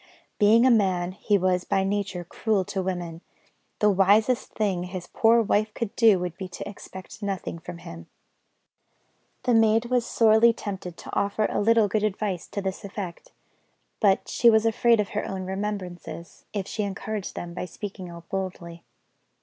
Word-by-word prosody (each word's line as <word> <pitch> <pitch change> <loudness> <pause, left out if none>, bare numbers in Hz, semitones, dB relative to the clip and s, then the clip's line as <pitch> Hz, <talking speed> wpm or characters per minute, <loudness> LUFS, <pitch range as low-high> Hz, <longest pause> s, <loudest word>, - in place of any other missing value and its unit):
Being 225 +3 +6
a 260 - +6
man, 185 -5 +2
he 205 +2 +1
was 180 -1 +1
by 195 - +1
nature 195 -2 -2
cruel 200 +2 -1
to 190 - -3
women; 175 -3 -4 0.6
the 210 0 +4
wisest 205 +6 +3
thing 190 -5 -1
his 180 -1 -6
poor 230 +4 +3
wife 215 +1 +1
could 230 -4 -4
do 225 -5 +6
would 180 -2 -4
be 190 - -5
to 180 - -7
expect 200 0 -10
nothing 195 -4 -4
from 175 +1 -8
him. 85 - -10 1.4
The 250 -1 +2
maid 225 +1 +3
was 250 -1 +3
sorely 225 0 +5
tempted 190 -5 -6
to - - -8
offer 200 +2 +1
a - - 0
little 225 0 +4
good 210 +2 0
advice 205 -3 -2
to 200 - -5
this 190 +2 -4
effect; 195 -3 -7 0.7
but 200 -3 +3
she 235 - +4
was 220 0 +4
afraid 230 +1 +3
of 210 -1 0
her 210 - -2
own 190 -1 -4
remembrances, 190 -3 -6
if 200 -2 -3
she 215 - -3
encouraged 205 0 -4
them 170 0 -6
by 180 - -4
speaking 190 0 -7
out 170 -1 -11
boldly. 175 -3 -5
200 Hz, 170 wpm, -25 LUFS, 180-215 Hz, 1.4 s, Being